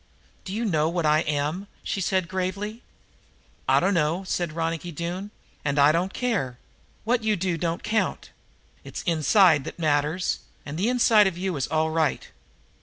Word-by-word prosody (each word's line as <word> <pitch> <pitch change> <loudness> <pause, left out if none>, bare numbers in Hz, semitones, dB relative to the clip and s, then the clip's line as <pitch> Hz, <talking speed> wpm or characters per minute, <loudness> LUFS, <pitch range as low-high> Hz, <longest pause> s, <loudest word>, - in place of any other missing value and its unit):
"Do 185 - -6
you 225 +4 -2
know 160 -6 +2
what 170 -1 -1
I 150 0 +4
am?" 155 +5 -2 0.2
she 195 - -2
said 185 -1 +1
gravely. 190 +5 -3 0.9
"I - - +6
dunno," 170 -1 +1
said 175 -4 -2
Ronicky, 165 +1 -2 0.7
"and 145 0 -1
I 145 +1 +6
don't 175 +4 0
care. 195 - -1 0.5
What 235 +1 +1
you 215 -1 +2
do 180 -2 -1
don't 165 0 -2
count. 220 0 -1 0.5
It's - - -7
the 175 - +1
inside 165 -1 +4
that - - -7
matters, 155 +2 0 0.3
and 145 - -6
the 210 +6 +2
inside 230 -4 +5
of 180 -3 -3
you 185 -1 -2
is 135 -2 -1
all 160 0 +1
right. 160 -3 0
175 Hz, 165 wpm, -25 LUFS, 155-195 Hz, 0.9 s, I